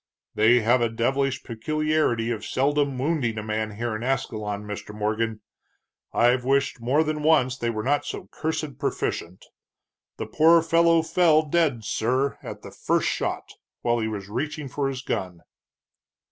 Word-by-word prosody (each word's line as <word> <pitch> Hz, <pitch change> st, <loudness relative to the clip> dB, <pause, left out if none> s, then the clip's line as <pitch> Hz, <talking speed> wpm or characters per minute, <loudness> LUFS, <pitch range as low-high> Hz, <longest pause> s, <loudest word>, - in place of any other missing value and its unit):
"They 115 Hz, +3 st, +4 dB
have 120 Hz, +3 st, +3 dB
a 115 Hz, -, +2 dB
devilish 130 Hz, +4 st, 0 dB
peculiarity 150 Hz, -1 st, 0 dB
of 110 Hz, -2 st, -4 dB
seldom 140 Hz, 0 st, 0 dB
wounding 130 Hz, -5 st, 0 dB
a 110 Hz, -, -3 dB
man 110 Hz, 0 st, -3 dB
here 115 Hz, 0 st, -2 dB
in 110 Hz, -, -5 dB
Ascalon, 110 Hz, -5 st, -2 dB
Mr. 105 Hz, 0 st, -7 dB
Morgan. 110 Hz, +1 st, -1 dB, 0.7 s
I've 120 Hz, +1 st, +3 dB
wished 135 Hz, -1 st, +1 dB
more 135 Hz, +7 st, +2 dB
than 155 Hz, -1 st, -2 dB
once 130 Hz, -5 st, +3 dB
they 120 Hz, -2 st, -2 dB
were 110 Hz, -2 st, -3 dB
not 145 Hz, +3 st, +1 dB
so -, -, -6 dB
cursed 155 Hz, -3 st, -3 dB
proficient. 90 Hz, +2 st, -3 dB, 0.7 s
The -, -, -4 dB
poor 165 Hz, +1 st, +5 dB
fellow 165 Hz, 0 st, +4 dB
fell 160 Hz, -1 st, +4 dB
dead, 150 Hz, -7 st, +1 dB
sir, 130 Hz, +6 st, 0 dB
at -, -, -8 dB
the -, -, -9 dB
first -, -, 0 dB
shot, -, -, -3 dB, 0.3 s
while 120 Hz, 0 st, +2 dB
he 110 Hz, -, -1 dB
was 100 Hz, -3 st, -5 dB
reaching 145 Hz, +7 st, -4 dB
for 140 Hz, +2 st, -1 dB
his 135 Hz, -1 st, -4 dB
gun." 90 Hz, -8 st, -3 dB
125 Hz, 160 wpm, -25 LUFS, 110-150 Hz, 0.7 s, poor